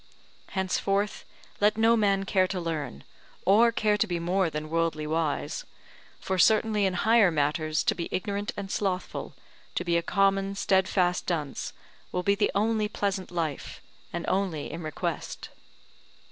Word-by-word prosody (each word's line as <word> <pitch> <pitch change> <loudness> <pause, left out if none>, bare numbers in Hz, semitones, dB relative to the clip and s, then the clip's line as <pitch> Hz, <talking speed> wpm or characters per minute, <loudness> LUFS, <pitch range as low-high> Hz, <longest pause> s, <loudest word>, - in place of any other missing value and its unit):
Henceforth 195 +2 -1 0.3
let 210 +1 +3
no 225 +1 +5
man 200 -3 +2
care 190 -1 +2
to 185 0 -3
learn, 155 - -4 0.4
or 225 +5 +6
care 210 -2 +2
to 220 - +2
be 175 -2 -1
more 175 +1 +1
than 155 0 -5
worldly 165 -2 0
wise; 155 -1 -1 0.6
for 190 -1 -2
certainly 215 +1 +4
in 185 - -2
higher 220 +1 +5
matters 155 0 0
to - - +2
be 170 - -5
ignorant 205 +1 -2
and 200 -1 -5
slothful, 190 -3 -2 0.4
to 175 - -1
be 170 -1 +2
a - - +1
common 195 +1 +1
steadfast 190 -2 +1
dunce, 150 -6 -2 0.4
will 180 - -1
be 200 - +3
the 205 +1 +1
only 215 +1 +2
pleasant 200 -2 -2
life, 165 -5 -3 0.3
and 170 - -4
only 185 -6 -1
in 165 - -6
request. 155 -3 -4
190 Hz, 150 wpm, -27 LUFS, 165-205 Hz, 0.6 s, or